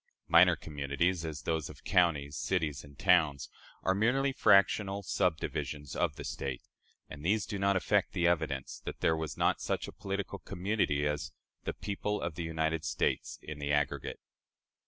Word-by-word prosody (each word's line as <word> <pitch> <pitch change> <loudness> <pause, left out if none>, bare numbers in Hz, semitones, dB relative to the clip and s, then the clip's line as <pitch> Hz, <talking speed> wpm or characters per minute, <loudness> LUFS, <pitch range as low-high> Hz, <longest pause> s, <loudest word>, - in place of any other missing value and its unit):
Minor 85 +2 +7
communities 75 +4 -1
as 80 -3 -5
those 80 -2 -1
of - - -12
counties, 75 -5 +2
cities, 75 -2 -1
and 70 -1 -15
towns 80 -7 +3 0.3
are 95 - +3
merely 125 +7 +2
fractional 100 -3 +4
subdivisions 80 -5 -1
of 75 - 0
the 75 - -7
State; 65 -3 -4 0.4
and 75 -1 -10
these 105 +5 +2
do 100 -3 -4
not 100 0 +3
affect 95 - +1
the 85 - +1
evidence 80 -6 0
that - - -6
there 80 - +3
was 80 -2 -4
not - - +2
such - - -2
a - - -7
political 100 0 -4
community 90 -6 0
as 75 0 -3 0.3
the - - -1
"people 105 +1 -3
of 85 - -3
the 85 - -5
United 80 -1 -1
States - - -1
in 75 -1 -7
the 70 0 -2
aggregate." 70 -1 0
80 Hz, 165 wpm, -31 LUFS, 75-95 Hz, 0.4 s, Minor